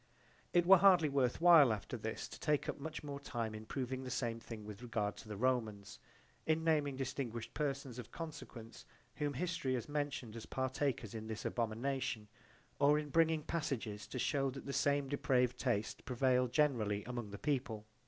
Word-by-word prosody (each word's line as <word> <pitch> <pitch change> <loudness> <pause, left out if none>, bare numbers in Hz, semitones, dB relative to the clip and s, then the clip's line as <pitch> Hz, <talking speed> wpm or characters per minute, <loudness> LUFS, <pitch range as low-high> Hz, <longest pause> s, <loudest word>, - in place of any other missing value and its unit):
It 175 -1 +4
were 190 0 +9
hardly 180 -5 +6
worth 135 -3 +1
while 165 -7 +8
after 105 -3 -3
this - - -4
to - - -10
take 150 -1 +1
up - - -3
much 155 +2 -5 0.2
time 115 -5 -3
in 110 0 -8
proving 130 0 -3
the 130 - -6
same 115 -2 -2
thing 115 -2 -8
with 105 +1 -8
regard 110 -4 -2
to - - -11
the 105 -1 -5
Romans, 110 -5 -1 0.5
in 160 0 +2
naming 150 -4 +2
distinguished 130 -3 -4
persons 135 -4 -2
of 120 - -8
consequence 125 -8 -8 0.3
whom 145 -2 -1
history 155 -4 -1
has 120 - -3
mentioned 145 -6 -3
as 115 - -8
partakers 130 -4 -1
in 110 -1 -6
this 110 -1 -5
abomination, 115 -1 -2 0.5
or 145 +1 +5
in 150 -1 -3
bringing 160 0 +3
passages 125 -11 -3
to - - -6
shew 135 +2 +1
that 135 +1 -8
the 140 - -4
same 140 0 +2
depraved 125 -3 +1
taste 115 -5 -1
prevailed 125 0 +2
generally 115 -9 +2
among 120 -4 -5
the 100 - -7
people. 125 -7 -2
130 Hz, 175 wpm, -36 LUFS, 115-145 Hz, 0.5 s, were